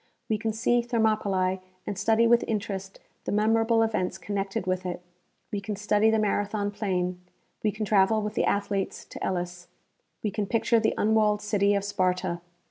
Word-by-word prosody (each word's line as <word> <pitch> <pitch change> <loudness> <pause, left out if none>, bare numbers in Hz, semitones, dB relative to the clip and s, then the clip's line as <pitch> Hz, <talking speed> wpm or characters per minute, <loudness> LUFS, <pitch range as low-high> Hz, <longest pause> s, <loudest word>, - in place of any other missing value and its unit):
We 215 -1 +1
can 220 0 -1
see 235 +2 +2
Thermopylae 215 -5 +1 0.3
and 205 - -3
study 225 +4 +3
with 235 0 +5
interest 195 -3 -3 0.3
the - - -2
memorable 225 +2 +3
events 190 -4 -1
connected 195 +1 -3
with 185 0 -1
it; 180 -1 -5 0.5
we 205 -2 -2
can 205 +1 -4
study 210 +1 +2
the 220 - +3
Marathon 205 -1 0
plain; 180 -3 -2 0.4
we 215 - +1
can 215 +1 -3
travel 205 +1 +4
with 210 0 -3
the - - +1
athletes 200 -1 -1
to - - -8
Elis; 175 -1 -3 0.6
we 210 - 0
can 205 +1 -2
picture 230 +1 +2
the 220 - +1
unwalled 215 -1 +2
city 205 -1 +2
of 200 - 0
Sparta 185 -3 0
205 Hz, 170 wpm, -27 LUFS, 190-220 Hz, 0.6 s, with